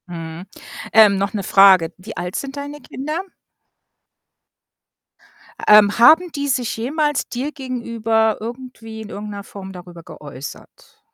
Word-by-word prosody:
Mhm. 165 0 -8 0.5
Ähm, 210 -2 +6
noch 200 +1 -2
'ne 205 -2 -3
Frage, 190 -4 +5
wie 185 +2 -10
alt 180 +1 -4
sind 275 0 -5
deine 285 +1 -7
Kinder? 305 +6 -5 2.5
Ähm, 210 0 +6
haben 325 +8 +6
die 285 -1 -3
sich 250 -3 -1
jemals 295 +5 -1
dir 265 +5 -4
gegenüber 230 -5 -1
irgendwie 230 -1 -8
in 215 - -9
irgendeiner 205 -1 -7
Form 195 -1 -10
darüber 175 -2 -12
geäußert? 145 - -11
220 Hz, 125 wpm, -20 LUFS, 195-265 Hz, 2.5 s, Ähm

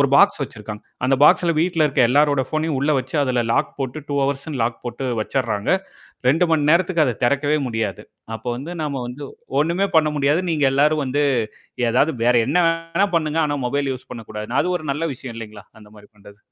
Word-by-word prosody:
1 140 - +4
box 200 -1 +5
வச்சிருக்காங்க. 105 -4 -7 0.2
அந்த 135 +1 +3
பாக்ஸ்ல 170 +2 +4
வீட்டில 165 -2 +2
இருக்க 135 -3 +1
எல்லாருடைய 145 -1 +3
ஃபோன்னையும் 155 -3 -1
உள்ள 140 +2 +1
வச்சு, 130 +3 -6
அதில 125 -3 0
லாக் - - 0
போட்டு 135 +2 -4
2 145 - -2
ஹார்ஸ்னு 140 0 -2
லாக் 115 0 -2
போட்டு 120 +2 -4
வச்சிர்றாங்க. 110 -3 -1 0.5
2 150 +8 +4
மணி 150 -2 +2
நேரத்துக்கு 170 0 +3
அத 125 -5 -1
தெறக்கவே 140 +4 +2
முடியாது. 110 -5 -3 0.3
அப்போ 110 +2 -6
வந்து 145 +8 -7
நம்ம 140 -3 -3
வந்து 125 +4 -8 0.4
ஒண்ணுமே 170 +6 +1
பண்ண 155 -1 +4
முடியாது. 145 +4 +2
நீங்க 155 -3 +1
எல்லாரும் 150 +2 +3
வந்து 140 +3 0 0.7
ஏதாவது 130 +7 +2
வேற 125 +1 +4
என்னா 175 +6 +2
வேணா 165 +4 0
பண்ணுங்க. 155 0 0
ஆனா 145 -1 -1
மொபைல் 140 +1 -1
யூஸ் 130 - -9
பண்ணக்கூடாது. 110 -2 -7
அது 180 +3 -1
ஒரு 155 - -11
நல்ல 150 +4 -3
விஷயம் 125 -2 -9
இல்லைங்களா? 110 -3 -9 0.2
அந்த 105 - -15
மாரி 105 0 -15
பண்றது! 100 0 -16
140 Hz, 190 wpm, -21 LUFS, 120-155 Hz, 0.7 s, box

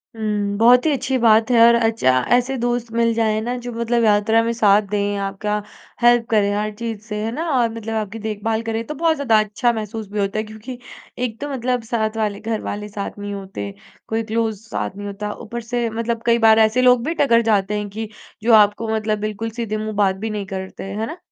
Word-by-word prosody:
हुँ। 210 -2 -1
बहुत 245 +4 +5
ही 315 - +3
अच्छी 265 -1 0
बात 225 -1 +4
है 240 - +5
और 235 - +6
अच्छा 225 - +2 0.3
ऐसे 250 +2 0
दोस्त 240 -1 -2
मिल 230 0 +2
जाएँ 220 -1 +1
ना 240 +3 -2
जो 245 - -4
मतलब 235 +1 0
यात्रा 215 +1 +3
में 230 - 0
साथ 210 -3 +4
दें 205 0 -1
आपका 210 +2 -2 0.4
हेल्प 240 -1 +5
करे 205 -2 +2
हर 210 +1 -1
चीज़ 225 -1 -5
से, 215 0 -7
है 225 - -2
ना? 325 +7 -3
और 245 -4 +2
मतलब 225 0 -5
आपकी 215 0 -3
देखभाल 220 +1 -2
करें 225 0 -2
तो 300 - -4
बहुत 325 +2 +2
ज़्यादा 250 -7 +3
अच्छा 215 +3 +1
महसूस 220 -1 -5
भी 210 - -3
होता 200 +1 -1
है - - -1
क्योंकि 220 +4 -9 0.4
एक 240 -3 -3
तो 290 - -3
मतलब 250 -2 -1
साथ 220 -1 -2
वाले 210 -2 -1
घरवाले 210 -2 -4
साथ 205 0 -6
नहीं 205 0 -5
होते। 190 - -6 0.3
कोई 225 +1 -1
क्लोज़ 220 -2 -2
साथ 190 - -3
नहीं 205 0 -6
होता। 210 +1 -5
ऊपर 235 +1 -7
से 235 0 -2
मतलब 230 +1 -3
कई 235 0 +4
बार 220 0 +6
ऐसे 220 +3 +4
लोग 250 -1 +5
भी 325 - -1
टकर 265 -6 +4
जाते 205 0 +1
हैं 210 0 -4
कि 220 +2 -6 0.3
जो 230 +1 +4
आपको 210 +1 +5
मतलब 215 -1 -1
बिल्कुल 215 +1 -3
सीधे 215 -2 -2
मुँह 215 0 -4
बात 195 -2 +2
भी 220 +4 -4
नहीं 210 -2 -4
करते, 190 0 -6
है 200 +3 -3
ना? 320 +8 -7
220 Hz, 220 wpm, -20 LUFS, 210-235 Hz, 0.4 s, और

